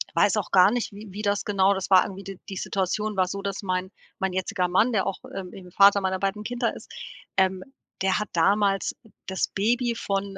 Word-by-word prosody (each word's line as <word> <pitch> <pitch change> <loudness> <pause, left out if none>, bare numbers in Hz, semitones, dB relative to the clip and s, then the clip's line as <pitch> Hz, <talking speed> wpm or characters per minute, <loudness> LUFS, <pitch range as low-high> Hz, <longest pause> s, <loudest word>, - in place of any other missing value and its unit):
Weiß - - +3
auch - - -2
gar 185 +1 +6
nicht, 245 -1 -2
wie 210 +2 -10
wie 205 +3 -6
das 205 -1 0
genau 200 -1 +3
das 190 -1 -4
war 190 -1 +7
irgendwie 195 0 -7
d 195 -1 -9
die 195 - -5
Situation 200 +3 -2
war 185 -1 +3
so, 200 +2 -4
dass 200 -1 -4
mein 185 -1 -2 0.3
mein 190 -1 -1
jetziger 185 0 -1
Mann, 200 +7 +3
der 195 -3 +1
auch, 195 - -2 0.2
ähm, 190 -2 -6
eben 180 -2 -11
Vater 200 +2 +6
meiner 190 0 -1
beiden 195 +2 -2
Kinder 240 +1 -1
ist, - - -12 0.5
ähm, 190 -1 +2 0.4
der 190 0 +2
hat 210 - -4
damals 195 +3 +2 0.3
das 190 0 -1
Baby 235 +4 +1
von 195 -2 -3
195 Hz, 215 wpm, -25 LUFS, 190-205 Hz, 0.5 s, war